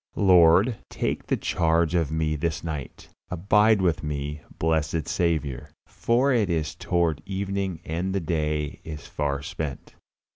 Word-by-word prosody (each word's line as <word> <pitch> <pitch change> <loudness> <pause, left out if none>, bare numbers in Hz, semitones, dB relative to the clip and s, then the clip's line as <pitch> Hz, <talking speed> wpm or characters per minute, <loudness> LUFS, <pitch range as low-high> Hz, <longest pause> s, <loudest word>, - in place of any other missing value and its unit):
Lord, 95 +4 +5
take - - -3
the - - +1
charge 85 -1 +1
of 80 -4 +1
me 80 -1 0
this 80 +1 -2
night. 75 -6 -6 0.2
Abide 105 +3 +3
with 85 -3 +1
me, 75 0 -4 0.2
blessed 80 -1 0
Saviour, 80 -7 -1 0.2
for 125 +4 +1
it 110 -5 +2
is 80 -2 -1
toward 85 -3 0
evening 95 -3 -3
and 85 +4 -2
the 100 - 0
day 75 -3 -2
is 75 -2 -8
far 70 -1 -2
spent. 80 -3 -6
80 Hz, 140 wpm, -25 LUFS, 75-95 Hz, 0.2 s, Lord